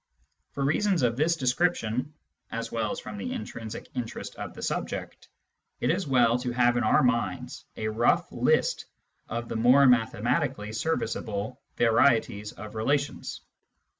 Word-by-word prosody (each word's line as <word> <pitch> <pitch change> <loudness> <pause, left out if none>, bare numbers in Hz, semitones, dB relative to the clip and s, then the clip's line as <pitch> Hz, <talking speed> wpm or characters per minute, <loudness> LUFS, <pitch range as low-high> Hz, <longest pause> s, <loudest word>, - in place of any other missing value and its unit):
For 140 - -1
reasons 185 +2 +2
of 115 -1 +2
this 160 +6 +2
description, 130 -2 0 0.4
as 115 0 -4
well 110 -2 -1
as - - -4
from 105 -1 -8
the - - -4
intrinsic 110 +1 -6
interest 125 -3 -5
of - - -6
the - - -9
subject, - - -4 0.5
it - - +2
is 185 - -1
well 125 -3 +4
to 125 0 -2
have 120 0 +3
in 120 - +1
our 110 - +4
minds 120 -7 -1
a 110 - -2
rough 110 +2 +2
list - - +1 0.4
of 115 +1 -3
the - - -3
more 125 +5 +6
mathematically 120 0 +1
serviceable 110 -3 -2 0.2
varieties 115 -3 +3
of 110 0 -10
relations. 140 +6 -1
120 Hz, 145 wpm, -27 LUFS, 110-135 Hz, 0.5 s, more